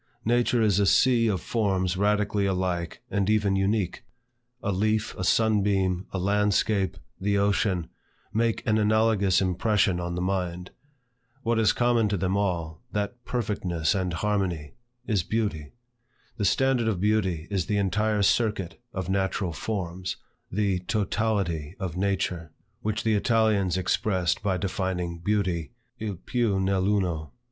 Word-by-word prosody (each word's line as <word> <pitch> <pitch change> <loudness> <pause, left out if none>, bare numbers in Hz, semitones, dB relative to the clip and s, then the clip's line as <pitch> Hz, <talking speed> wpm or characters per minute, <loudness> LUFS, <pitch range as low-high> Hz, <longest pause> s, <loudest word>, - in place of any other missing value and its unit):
Nature 120 0 +2
is 100 -3 +3
a 100 - +3
sea 120 +1 +4
of 100 -4 +1
forms 95 -5 0
radically 105 0 +1
alike 90 -3 -2
and 100 0 +1
even 105 -2 +2
unique. 95 -1 0 0.6
A 100 - 0
leaf, 110 +3 0
a 95 - -4
sun 110 +2 +3
beam, 95 -2 0
a - - -4
landscape, 100 +1 +1 0.2
the 100 +1 +1
ocean, 100 -3 +1 0.5
make 115 +1 0
an 110 0 +2
analogous 105 -3 +3
impression 95 0 +1
on 85 0 -3
the - - -2
mind. 90 -1 -2 0.7
What 115 -1 +1
is 110 - +4
common 120 -3 +2
to 100 - 0
them 95 +1 0
all, 85 -6 -1
that 105 +4 -3
perfectness 95 -9 -1
and 95 -3 -1
harmony, 90 -5 -1 0.3
is 105 -5 +1
beauty. 85 -7 -2 0.7
The 105 - 0
standard 130 0 +2
of 105 -5 0
beauty 95 -5 +1
is 95 -4 -1
the 105 - +1
entire 105 +2 +1
circuit 105 -3 +1
of 95 -2 -3
natural 95 -2 -1
forms, 95 -1 -4 0.3
the 100 -2 +1
totality 95 -5 -1
of 95 -4 -4
nature; 90 -4 -1 0.3
which 110 0 -2
the 110 - +2
Italians 105 -4 +2
expressed 95 -1 0
by 95 -2 0
defining 90 -3 -2
beauty 90 -2 -1 0.3
"il 105 -3 -3
piu 105 +2 0
nell' 95 0 +1
uno." 90 -7 0
100 Hz, 140 wpm, -26 LUFS, 90-105 Hz, 0.7 s, sea